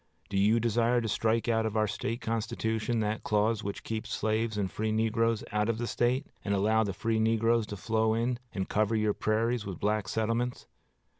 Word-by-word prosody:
Do 100 - -2
you 110 +4 +4
desire 120 +1 +2
to 115 - -2
strike 110 +2 +1
out 115 -1 +2
of 110 0 -3
our 110 - +3
State 115 +3 -3
constitution 110 0 -1
that 105 +1 -1
clause 110 +1 +1
which 100 0 -5
keeps 110 0 -4
slaves 110 0 0
and 95 -3 -1
free 110 0 -1
negroes 115 0 +1
out 105 +1 +1
of 115 - 0
the 120 - -2
State, 125 +4 0 0.2
and 100 -1 0
allow 110 +3 +3
the 100 - -2
free 110 +4 -1
negroes 115 0 +2
to 105 - -6
flow 110 +2 +1
in, 120 +1 0
and 95 -3 -3
cover 110 +1 +1
your 105 -1 +2
prairies 115 +2 0
with 95 -4 -6
black 105 -1 0
settlements? 115 +4 -1
110 Hz, 200 wpm, -29 LUFS, 105-115 Hz, 0.2 s, you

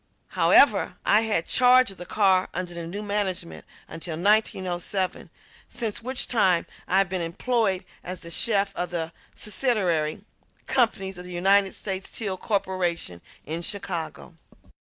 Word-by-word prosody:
However, - - +4
I 210 - +5
had 215 -7 0
charge 255 -2 +5
of 195 - -13
the 180 - -9
car 190 -3 +2
under 180 0 -4
the 170 -1 -6
new 200 +5 -5
management 190 - -3 0.2
until 165 -1 -5
1907, 190 -1 0 0.4
since 230 -3 -3
which 255 +2 0
time 190 -7 +2 0.2
I 190 - +2
have 195 -1 +4
been 185 0 -2
employed 190 +2 0 0.2
as 180 -1 -6
chef 200 -2 +2
of 175 0 -2
the 165 -1 -3 0.2
subsidiary 195 - 0 0.4
companies 195 -7 0
of 180 - -8
the 180 - -8
United 195 +2 +3
States 190 -1 -3
Steel 200 -4 -3
Corporation 180 - -2 0.2
in 160 +3 -4
Chicago. 175 -3 -5
190 Hz, 135 wpm, -25 LUFS, 175-210 Hz, 0.4 s, I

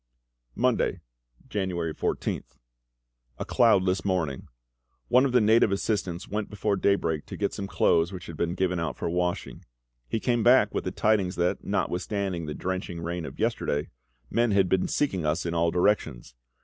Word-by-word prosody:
Monday, - - +1 0.5
January 90 -5 -2
14th. - - -3 0.8
A - - -4
cloudless 95 -6 +3
morning. 85 -9 -1 0.6
One 125 +2 +5
of 135 - 0
the 125 - +5
native 110 -1 +4
assistants 95 -3 -2
went 105 0 -3
before 105 -1 -1
daybreak 85 -6 0
to - - -7
get - - -1
some 100 - -4
clothes 85 -2 +2
which 90 -2 -8
had 85 - -8
been 85 +2 -1
given 90 -2 0
out 80 -2 -3
for - - -2
washing. 90 0 -2 0.5
He 115 - -1
came 120 0 +1
back 125 +4 +5
with - - -2
the - - -1
tidings 100 -4 +1
that, 90 +1 0
notwithstanding 90 -2 -2
the 75 - -4
drenching 90 -2 -4
rain 85 0 -4
of - - -9
yesterday, 75 +1 -1 0.4
men 120 - +1
had 95 -2 +4
been 95 +1 +1
seeking 95 - 0
us 75 +2 0
in 85 - -2
all 85 0 +2
directions. 80 -9 0
95 Hz, 165 wpm, -27 LUFS, 85-105 Hz, 0.8 s, One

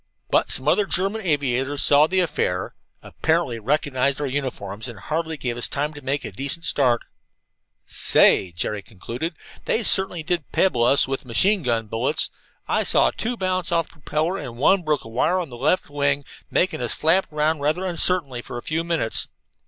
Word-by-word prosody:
"But - - +2
some 130 - +2
other 200 +6 +3
German 195 +5 -1
aviators 140 - +1
saw 145 +1 +5
the 185 +2 +1
affair, 90 - -2 0.3
apparently 160 -8 -1
recognized 140 +2 0
our 145 - -2
uniforms, 125 -7 -4
and 120 -4 -9
hardly 160 - -3
gave 125 -3 -3
us 120 - -1
time 145 +2 -3
to 145 - -11
make 140 +1 -2
a - - -6
decent 140 +5 -3
start. 125 -4 +2 0.8
"Say," 95 - +4
Jerry 100 +5 -3
concluded, 120 - -6 0.3
"they 230 - 0
certainly 190 -5 +4
did 170 -2 -3
pebble 125 -11 +2
us 130 +3 +4
with 135 0 -3
machine 190 - +2
gun 115 -5 -1
bullets! 115 +8 +1 0.4
I - - +1
saw - - +3
two 240 +2 -3
bounce 185 -3 -1
off 165 -1 +1
the 165 - -21
propeller, 160 +7 -1
and 120 -2 -8
one 185 +9 +3
broke 155 -3 -1
a - - -11
wire 150 +11 +1
on 165 -7 -5
the - - -8
left 145 +9 +1
wing, 145 -1 -1 0.2
making 185 -7 0
us 120 - -2
flap 170 +3 +2
around 155 +1 0
rather 155 +6 0
uncertainly 170 -7 +1
for 120 - -8
a 120 - -7
few 160 +1 -2
minutes. 165 -9 0
145 Hz, 185 wpm, -22 LUFS, 125-170 Hz, 0.8 s, saw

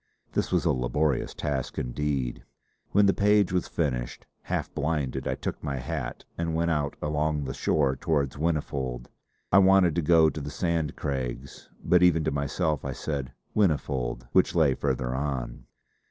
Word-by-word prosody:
This - - -1
was - - +1
a - - +4
laborious 65 +3 0
task 70 -4 -3
indeed. 65 0 -2 0.5
When 100 +1 +5
the 100 - +4
page 105 -2 +3
was 90 - 0
finished, 65 -7 -2 0.2
half - - -3
blinded, 70 -4 -1
I - - 0
took - - -5
my 70 - -2
hat 65 -2 -4
and 85 -1 -1
went 85 +1 +1
out 75 -2 -1
along 75 0 0
the 65 -1 -4
shore 70 -4 +1
towards 70 -1 0
Whinnyfold. 70 -6 -2 0.4
I 95 - +7
wanted 95 -3 +5
to 85 - 0
go 80 0 +5
to 75 - -6
the 70 - -5
Sand 80 0 -1
Craigs; 65 -1 -4
but 90 0 +4
even 85 -3 +4
to - - 0
myself 70 +2 -1
I - - -3
said 70 -5 -4 0.2
'Whinnyfold' 65 - 0
which 95 - +3
lay 80 -5 +4
farther 65 -2 -1
on. 65 -3 -3
75 Hz, 165 wpm, -27 LUFS, 65-80 Hz, 0.5 s, I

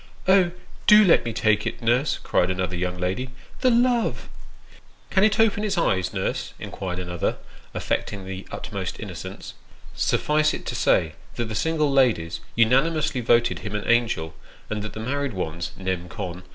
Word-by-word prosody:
" - - -21
Oh! 190 -2 +5 0.4
do 210 0 +8
let 175 - +5
me 115 - -3
take 110 -1 +1
it, - - -4
nurse," 125 +4 +1
cried 90 - +1
another 90 -1 -1
young 90 0 -2
lady. 95 +9 -2 0.2
" - - -21
The 255 - +4
love! 240 0 +1 0.3
" - - -24
" - - -31
Can 190 - +3
it 215 0 +3
open 215 -2 +3
its 200 -3 -1
eyes, 95 - +1
nurse? - - -3
" - - -26
inquired 90 -2 -5
another, 85 -2 -2 0.4
affecting 100 -2 -2
the 95 0 -7
utmost - - -5
innocence. - - -7 0.4
Suffice 150 0 +1
it - - -9
to - - -3
say, 80 -1 +2 0.2
that 120 - -2
the 110 - -5
single 155 +4 +1
ladies 110 -12 +2 0.2
unanimously 135 +4 +2
voted 120 +1 +3
him 105 -1 -5
an 105 - -3
angel, 115 -10 +1 0.4
and 105 -1 -2
that 105 0 -6
the - - -7
married 140 +3 -2
ones, 85 -2 -4
nem. 95 -2 -3
con. 90 +2 -6
115 Hz, 180 wpm, -24 LUFS, 95-155 Hz, 0.4 s, do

